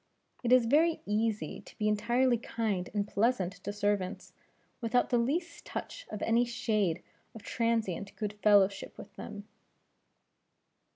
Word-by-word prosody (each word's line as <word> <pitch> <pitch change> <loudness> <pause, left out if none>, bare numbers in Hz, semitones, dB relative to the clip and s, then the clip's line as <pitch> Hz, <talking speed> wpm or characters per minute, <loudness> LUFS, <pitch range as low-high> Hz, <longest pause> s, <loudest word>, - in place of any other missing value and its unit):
It 240 - -1
is 250 -2 +6
very 315 +7 +3
easy 215 +1 -1
to - - -16
be 215 - 0
entirely 240 +4 +2
kind 215 -6 -2
and 205 -1 -1
pleasant 200 -4 +1
to - - -3
servants, 205 -2 -1 0.5
without 240 +2 +1
the 240 - +4
least 330 +9 -1
touch - - -6
of 210 - -5
any 230 +2 +3
shade 215 -7 0 0.3
of 220 - -10
transient 225 -5 -1
good 210 -1 -3
fellowship 200 -2 +3
with - - -11
them." 205 0 -8
220 Hz, 135 wpm, -31 LUFS, 205-240 Hz, 0.5 s, is